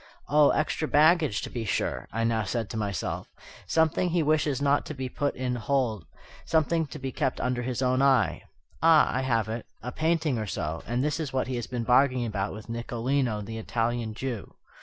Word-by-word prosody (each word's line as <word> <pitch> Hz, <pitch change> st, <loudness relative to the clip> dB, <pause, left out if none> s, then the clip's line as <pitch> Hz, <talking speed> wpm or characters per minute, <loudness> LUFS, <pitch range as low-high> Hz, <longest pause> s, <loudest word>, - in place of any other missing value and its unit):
"Oh, 150 Hz, 0 st, +5 dB
extra 155 Hz, 0 st, 0 dB
baggage, 155 Hz, -, +4 dB
to -, -, -6 dB
be 120 Hz, -, -3 dB
sure," 110 Hz, -, -2 dB
I 115 Hz, +3 st, -1 dB
now 115 Hz, -1 st, +1 dB
said 110 Hz, +2 st, -3 dB
to -, -, -6 dB
myself; 105 Hz, -3 st, -3 dB, 0.4 s
"something 160 Hz, +2 st, +2 dB
he 170 Hz, -1 st, +1 dB
wishes 150 Hz, -3 st, +1 dB
not 140 Hz, 0 st, +2 dB
to 155 Hz, -, -6 dB
be 130 Hz, -1 st, -4 dB
put 145 Hz, +2 st, -1 dB
in 125 Hz, -1 st, -2 dB
the 125 Hz, -, -3 dB
hold, 115 Hz, -6 st, -1 dB, 0.4 s
something 160 Hz, 0 st, +1 dB
to 150 Hz, -, -8 dB
be 135 Hz, -2 st, -4 dB
kept 130 Hz, -3 st, -1 dB
under 125 Hz, -1 st, -1 dB
his 125 Hz, 0 st, -2 dB
own 130 Hz, +1 st, +2 dB
eye, 130 Hz, -, +3 dB, 0.4 s
ah, 160 Hz, -1 st, +5 dB
I 130 Hz, -, +1 dB
have 115 Hz, -5 st, +1 dB
it! 115 Hz, +1 st, -5 dB, 0.2 s
a 125 Hz, -, -4 dB
painting 155 Hz, -4 st, 0 dB
or 110 Hz, -, -3 dB
so, 80 Hz, -3 st, -3 dB
and 120 Hz, +3 st, 0 dB
this 150 Hz, +2 st, 0 dB
is 150 Hz, -5 st, -4 dB
what 130 Hz, -, +1 dB
he 130 Hz, -, -3 dB
has 120 Hz, -, -4 dB
been 125 Hz, -2 st, -3 dB
bargaining 125 Hz, +1 st, +3 dB
about 100 Hz, -3 st, -2 dB
with 110 Hz, +1 st, -9 dB
Nicolino, 120 Hz, 0 st, -1 dB
the 110 Hz, +2 st, -6 dB
Italian 115 Hz, 0 st, -2 dB
Jew." 120 Hz, -4 st, -5 dB
125 Hz, 205 wpm, -27 LUFS, 115-145 Hz, 0.4 s, Oh